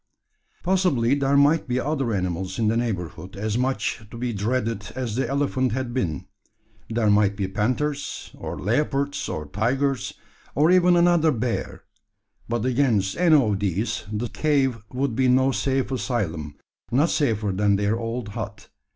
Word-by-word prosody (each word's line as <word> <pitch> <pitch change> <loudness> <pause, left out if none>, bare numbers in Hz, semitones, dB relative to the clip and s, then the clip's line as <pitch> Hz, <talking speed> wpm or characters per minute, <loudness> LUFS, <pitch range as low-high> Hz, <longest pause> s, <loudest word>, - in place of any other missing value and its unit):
Possibly 175 -10 +2
there 140 0 +2
might 145 +3 +4
be 125 0 0
other 135 -3 -1
animals 95 -1 -2
in 110 -2 +2
the 110 - +1
neighbourhood 95 -6 -3
as 105 +2 -2
much 130 -1 -1
to 115 - -9
be 120 0 -2
dreaded 110 0 -2
as 125 -5 -3
the 135 - -1
elephant 135 -3 0
had 130 -1 -3
been. 90 -7 -2 0.6
There 110 -2 +2
might 105 -1 +3
be 100 -3 -1
panthers, 130 +9 -2
or - - -6
leopards, 140 +6 -1
or 75 - -4
tigers, 125 - -1 0.4
or 150 +6 +4
even 180 -1 +5
another 170 -2 +4
bear; 120 -2 -3 0.7
but 120 0 -1
against 120 -7 +2
any 170 -2 +5
of 105 -6 +1
these 105 +3 -1
the 110 +3 -2
cave 135 -6 +1
would 130 -2 -1
be 130 +1 +2
no 130 +2 +4
safe 135 0 0
asylum 95 - -2 0.4
not 145 +7 +3
safer 110 -8 +1
than 100 +1 +2
their 105 +2 +1
old 115 -1 -4
hut. 105 -1 -7
120 Hz, 155 wpm, -24 LUFS, 105-135 Hz, 0.7 s, even